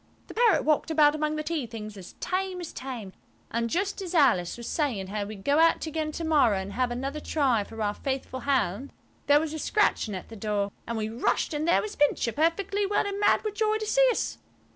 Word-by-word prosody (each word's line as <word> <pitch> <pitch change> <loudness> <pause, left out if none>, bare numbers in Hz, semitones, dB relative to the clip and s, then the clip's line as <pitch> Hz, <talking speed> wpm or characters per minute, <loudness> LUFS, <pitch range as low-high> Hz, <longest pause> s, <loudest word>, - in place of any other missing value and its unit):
The - - -11
parrot 465 -3 +4
walked 305 +1 +2
about 300 -2 +5
among 305 0 -1
the 305 - -3
tea 305 -5 -2
things 215 -2 -8
as 185 -2 -11
tame 370 0 -2
as 350 - -7
tame. 235 -6 -6 0.4
And 230 0 -1
just 390 - -1
as 365 -2 -5
Alice 210 - +3
was 235 - -7
saying 255 - -1
how 205 0 -2
we'd 200 -1 -9
go 285 +2 +3
out 330 0 +4
again 315 0 -2
to 335 - -4
morrow 290 -10 +3
and 190 +1 -5
have 250 0 0
another 270 +5 -3
try 270 -8 +1
for 225 +2 -11
our 205 0 0
faithful 265 +1 -4
hound 265 -3 0 0.4
there 290 0 +6
was 315 0 -3
a 315 - -4
scratching 295 - +1
at 185 - -8
the 225 - -9
door, 205 -1 -1 0.2
and 230 - -3
we 215 -1 -1
rushed–and 295 +7 -1
there 340 - +4
was 425 -1 -6
Pincher, 290 -5 +2
perfectly 380 - 0
well 410 +1 +1
and 400 0 -3
mad 410 - +3
with 430 -2 -2
joy 430 0 +1
to 435 - -4
see - - +4
us. 480 - -2
290 Hz, 225 wpm, -27 LUFS, 225-335 Hz, 0.4 s, there